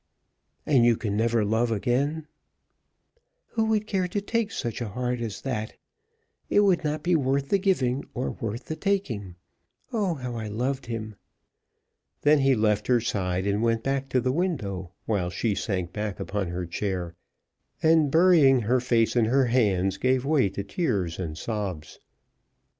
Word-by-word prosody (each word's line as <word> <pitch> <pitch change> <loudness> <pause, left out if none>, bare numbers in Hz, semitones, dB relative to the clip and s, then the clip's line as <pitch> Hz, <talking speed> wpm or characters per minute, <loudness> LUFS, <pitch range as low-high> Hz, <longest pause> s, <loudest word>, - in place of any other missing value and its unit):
"And 135 -5 +4
you 120 -1 +4
can 105 -3 -2
never 115 0 +2
love 110 +3 +1
again?" 135 +8 0 1.2
"Who 225 -1 0
would 215 -1 0
take 205 +4 -1
such 120 0 -4
a 120 - -2
heart 125 +3 -2
as 110 -3 -4
that? 110 -5 -3 0.8
It 205 - +4
would 185 -4 +3
not 150 0 -2
be 180 0 +3
worth 140 -1 0
the 200 - +3
giving 140 -10 +1
or 125 - -2
worth 115 +2 -5
the 155 - -4
taking. 135 - -2 0.6
Oh 200 -7 0
how 125 -3 -5
I 110 -1 -4
loved 125 +6 -2
him!" 110 -3 -5 1.1
Then 150 0 +5
he 135 -1 +4
left 105 -2 +1
her 125 -1 +4
side, 95 -4 -1
and 100 +1 0
went 115 -1 +1
back 135 0 -1
to 130 - +2
the 130 +1 0
window, 120 - -2 0.2
while 100 -5 0
she 105 +4 -1
sank 90 -4 -3
back 105 -2 -4
upon 100 -2 -2
her 90 +1 -3
chair, 90 -1 -3 0.7
and, 160 -2 +5
burying 160 -5 +5
her 120 +4 +2
face 120 -2 +1
in 120 -2 +4
her 130 +4 +3
hands, 100 -6 +1
gave 130 0 +1
way 140 -8 +3
to 100 +1 -5
tears 100 - -2
and 80 -4 -4
sobs. 100 -8 -5
120 Hz, 160 wpm, -26 LUFS, 105-145 Hz, 1.2 s, Then